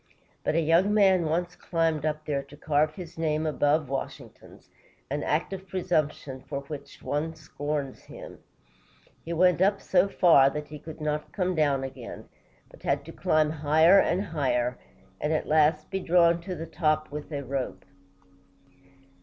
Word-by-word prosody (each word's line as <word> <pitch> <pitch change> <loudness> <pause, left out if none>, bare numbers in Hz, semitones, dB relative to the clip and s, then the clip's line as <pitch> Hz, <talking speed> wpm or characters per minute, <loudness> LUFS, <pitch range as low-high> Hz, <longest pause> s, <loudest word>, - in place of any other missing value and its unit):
But - - 0
a 165 - +3
young 170 +6 +3
man 190 -4 +4
once 175 +3 -1
climbed 165 -4 0
up 155 0 -3
there 140 -2 -1
to 140 +1 -15
carve 155 0 +1
his 175 -3 -9
name 155 -1 0
above 150 -1 +1
Washington's, 135 +1 -7 0.4
an 145 +1 -1
act 160 +7 -1
of 190 0 -7
presumption 150 -7 -2
for 140 -1 -3
which 140 -1 -9
every - - -16
one 160 +3 -2
scorns 145 -3 -4
him. - - -11 0.8
He 165 - -6
went 180 +1 +3
up 200 +1 +3
so 185 +1 +2
far 160 -8 +5
that 150 +1 -6
he 150 -1 -8
could 155 +1 -10
not 150 0 -2
come 185 -2 -1
down 145 -5 +1
again, 135 - -8 0.4
but - - -17
had - - -1
to - - -9
climb 155 -1 +1
higher 160 +5 +5
and 185 +2 +1
higher, 125 -7 -1 0.4
and 150 - -1
at 155 - 0
last 155 0 +2
be 190 - -1
drawn 170 -1 +3
to 185 +1 -5
the 165 0 -6
top 155 -2 0
with 150 +2 -7
a 140 -2 -3
rope. 135 -1 -4
155 Hz, 170 wpm, -27 LUFS, 145-170 Hz, 0.8 s, far